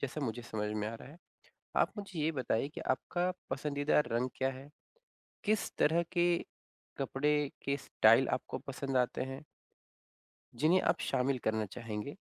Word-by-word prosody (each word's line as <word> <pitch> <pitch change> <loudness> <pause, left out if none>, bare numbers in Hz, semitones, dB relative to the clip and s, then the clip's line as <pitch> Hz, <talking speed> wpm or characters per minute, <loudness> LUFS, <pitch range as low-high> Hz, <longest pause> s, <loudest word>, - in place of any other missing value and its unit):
जैसा 140 +2 -3
मुझे 120 -3 -2
समझ 105 -3 -3
में 105 0 -1
आ 115 - -5
रहा 115 - -10
है। 155 +4 -13 0.6
आप - - +4
मुझे 195 -4 -5
ये 155 +2 +2
बताइए 130 -1 0
कि 150 - -7
आपका 180 +1 0 0.2
पसंदीदा 145 +2 +1
रंग 120 +2 0
क्या 130 0 +1
है? 135 +2 -10 0.8
किस 215 -2 +1
तरह 165 +3 +4
के 175 -1 +4 0.6
कपड़े 145 +1 +1
के 140 0 0
स्टाइल 120 -2 +5
आपको 130 - -6
पसंद 135 0 -3
आते 125 -1 +2
हैं? 135 +3 -7 1.1
जिन्हें 155 +9 +4
आप - - +2
शामिल 130 +1 +1
करना 110 -1 +1
चाहेंगे। 110 +4 -5
135 Hz, 155 wpm, -33 LUFS, 120-150 Hz, 1.1 s, स्टाइल